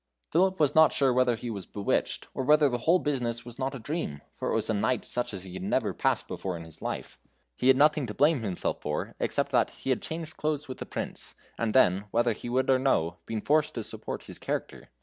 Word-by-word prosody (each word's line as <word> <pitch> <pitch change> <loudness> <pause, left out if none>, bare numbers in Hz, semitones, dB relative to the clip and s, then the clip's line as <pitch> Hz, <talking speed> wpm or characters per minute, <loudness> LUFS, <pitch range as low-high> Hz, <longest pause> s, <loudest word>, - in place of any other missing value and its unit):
Phipip 190 +3 +3
was 150 -3 +3
not 160 -1 +7
sure 135 -3 +2
whether 125 -1 +3
he 120 +1 -5
was 100 -4 -6
bewitched, 100 -1 -1
or 130 - -2
whether 150 +2 +5
the 120 -1 -2
whole 175 - +7
business 120 -7 -2
was 120 +1 -9
not 135 +1 -1
a - - -6
dream, 110 - -4
for - - -3
it - - +1
was - - +1
a - - +1
night 110 +5 0
such 125 - -1
as 95 -3 -6
he 95 -2 -9
had 95 - -6
never 95 - 0
passed - - 0
before 95 -2 -4
in 85 - -8
his 80 -1 -12
life. - - -5 0.4
He 125 - 0
had 130 0 +7
nothing 150 -2 +4
to 105 - -6
blame 150 -2 +4
himself 95 -5 -2
for 75 0 -3
except - - 0
that - - +3
he 135 - -4
had 130 - +1
changed 160 -1 -6
clothes 150 -1 -1
with 130 - -7
the - - -6
Prince, - - -6 0.2
and 115 -2 -2
then, 100 -6 +4
whether 120 +2 +2
he 120 - -7
would 130 +2 +1
or 130 - +4
no, 85 -11 +1
been 110 -1 -2
forced 150 +4 +2
to 115 - -3
support - - -6
his - - -10
character. - - -4
125 Hz, 245 wpm, -28 LUFS, 105-145 Hz, 0.4 s, not